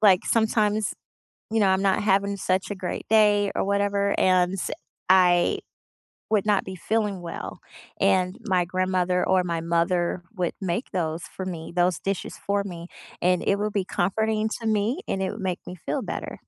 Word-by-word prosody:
like 195 -4 +5
sometimes 215 -2 +1 0.6
you 225 0 +1
know, 200 - +4
I'm 190 0 +3
not 195 +1 +2
having 200 0 +2
such 190 0 -1
a - - -2
great 185 -1 -4
day 205 -2 +4
or - - +1
whatever 200 0 +1
and 185 0 +3
s 195 - -3 0.4
I 180 -2 +5 0.7
would 210 -2 +2
not 205 -2 +2
be 190 - -7
feeling 205 0 -1
well. 170 -1 -6 0.4
And 185 0 +2
my 185 -3 +2
grandmother 185 0 0
or 185 -1 +3
my 170 -2 -2
mother 170 +1 0
would 175 -2 0
make 190 +6 -2
those 165 -2 -2
for 190 - -7
me 170 -2 -6
those 175 -1 +2
dishes 195 -1 -3
for 200 0 -1
me, 175 -3 -7 0.3
and 180 0 +2
it 200 - +3
will 210 0 -1
be 200 -2 0
comforting 215 +4 0
to 225 - -2
me 215 +4 +1
and 195 - -1
it 190 - -1
would 210 - -8
make 185 -2 -2
me 180 - -6
feel - - -1
better. - - -5
190 Hz, 180 wpm, -25 LUFS, 180-205 Hz, 0.7 s, like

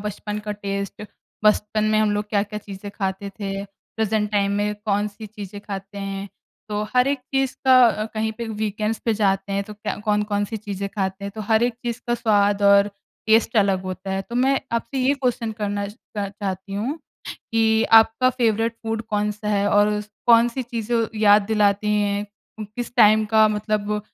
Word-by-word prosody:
बचपन 210 0 -4
का 210 - -1
टेस्ट 200 -1 -5 0.4
बचपन 210 0 +2
में 215 0 +2
हम 215 -1 +3
लोग 210 0 -2
क्या-क्या 210 0 -1
चीज़ें 200 -1 -9
ख़ाते 195 0 -3
थे, 195 -1 -5
प्रेज़ेंट 210 +1 -3
टाइम 200 -1 +2
में 210 0 0
कौन-सी 210 0 -2
चीज़ें 205 -1 -9
ख़ाते 200 0 -7
हैं। 195 0 -5 0.4
तो 210 0 -2
हर 250 +2 +4
एक 280 - 0 0.2
चीज़ 270 -1 +1
का 260 -1 +7
अ, 215 -2 0
कहीं 220 0 -1
पे 235 +2 -6
वीकेंड्स 215 0 -2
पे 230 - +2
जाते 195 -1 0
हैं 200 0 0
तो 210 - -10
क्या 210 - -4
कौन-कौन-सी 210 0 0
चीज़ें 200 -2 -5
खाते 190 0 -2
हैं। 200 - -4
तो 220 - -6
हर 220 +1 +4
एक 240 -1 +1
चीज़ 235 0 -3
का 240 - +1
स्वाद 205 -3 +2
और 200 0 +6 0.4
टेस्ट 225 +1 +3
अलग 195 -3 +3
होता 185 +1 -6
है। 195 0 -1
तो 235 - -10
मैं 265 +2 +2
आपसे 235 +4 -2
ये 260 +2 +3
क्वेश्चन 245 -4 -1
करना 205 0 -1
अ, 205 -1 -6
चाहती 195 -1 -5
हूँ 245 +10 -2 0.4
कि 225 0 +1 0.2
आपका 225 +3 0
फ़ेवरेट 230 -2 0
फूड 225 0 -2
कौन-सा 210 0 -1
है 205 -1 +1
और 205 0 +4
उस 210 0 -3 0.2
कौन-सी 235 +2 +4
चीज़ें 235 -1 -2 0.2
याद 205 0 +6
दिलाती 210 0 +2
हैं 205 0 -1 0.3
उम, 215 - -4
किस 235 +4 -7
टाइम 215 -1 +6
का 220 -1 +6
मतलब 210 0 -1
210 Hz, 185 wpm, -22 LUFS, 200-225 Hz, 0.4 s, का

